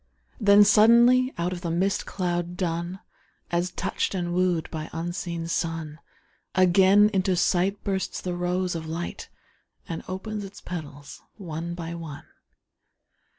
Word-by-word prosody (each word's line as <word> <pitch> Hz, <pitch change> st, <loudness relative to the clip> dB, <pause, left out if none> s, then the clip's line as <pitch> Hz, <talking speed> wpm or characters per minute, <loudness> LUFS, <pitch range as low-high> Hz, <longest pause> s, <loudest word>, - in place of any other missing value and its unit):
Then 205 Hz, -2 st, +7 dB
suddenly 235 Hz, +5 st, +6 dB
out 175 Hz, +2 st, -1 dB
of 175 Hz, -, -6 dB
the 170 Hz, -, -3 dB
mist 185 Hz, +4 st, 0 dB
cloud 175 Hz, -1 st, -2 dB
dun, 175 Hz, +1 st, -3 dB, 0.5 s
As 175 Hz, +1 st, 0 dB
touched 190 Hz, +2 st, -2 dB
and 175 Hz, -2 st, -2 dB
wooed 180 Hz, -2 st, +1 dB
by 155 Hz, 0 st, -5 dB
unseen 170 Hz, 0 st, -4 dB
sun, 165 Hz, -2 st, -3 dB, 0.6 s
Again 190 Hz, +3 st, +5 dB
into 190 Hz, -1 st, +2 dB
sight 185 Hz, +3 st, +1 dB
bursts 190 Hz, -2 st, -2 dB
the 180 Hz, -, -4 dB
rose 180 Hz, +1 st, -1 dB
of 160 Hz, -1 st, -5 dB
light 165 Hz, +2 st, -5 dB, 0.6 s
And 165 Hz, -, -4 dB
opens 205 Hz, +3 st, -5 dB
its 195 Hz, 0 st, -10 dB
petals 145 Hz, -5 st, -8 dB, 0.2 s
one 170 Hz, -3 st, -5 dB
by 170 Hz, -1 st, -5 dB
one. 160 Hz, -4 st, -8 dB
175 Hz, 135 wpm, -26 LUFS, 170-190 Hz, 0.6 s, Then